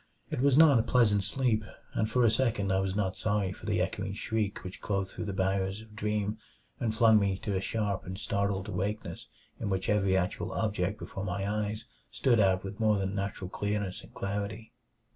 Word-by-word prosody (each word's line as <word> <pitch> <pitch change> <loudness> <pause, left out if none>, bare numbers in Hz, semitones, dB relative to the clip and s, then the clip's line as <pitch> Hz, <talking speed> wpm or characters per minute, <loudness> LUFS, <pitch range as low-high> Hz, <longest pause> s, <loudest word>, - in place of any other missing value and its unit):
It - - -1
was 140 -1 +4
not 150 -6 +8
a - - +5
pleasant 110 -4 +3
sleep, 110 +1 +1 0.3
and 110 -1 0
for 125 +2 +3
a 110 - +5
second 110 -5 +1
I 95 - +3
was 95 0 -1
not 95 -3 0
sorry 105 -3 0
for 95 - -10
the 105 -4 +1
echoing 95 +1 -1
shriek 105 0 -2
which 90 +1 -8
clove 100 -2 -1
through 110 - -5
the 100 - -2
barriers 95 +1 0
of 110 -1 -15
dream 105 0 -1 0.4
and 110 -2 -1
flung 110 -1 +6
me 100 -2 +1
to 100 - -3
a 95 - 0
sharp 100 -2 -2
and 95 +1 -5
startled 100 0 -1
awakeness 105 -4 -3 0.3
in 105 - -2
which 95 -1 -1
every 100 -2 +3
actual 90 +1 -1
object 105 -2 0
before 95 - -6
my 95 +1 -2
eyes 105 +1 -2 0.2
stood 120 -4 +2
out 95 -2 +3
with 100 +2 -7
more 110 -2 +3
than 95 0 -1
natural 100 -1 -3
clearness 100 0 -2
and - - -15
reality. 105 +3 -3
100 Hz, 200 wpm, -30 LUFS, 95-110 Hz, 0.4 s, not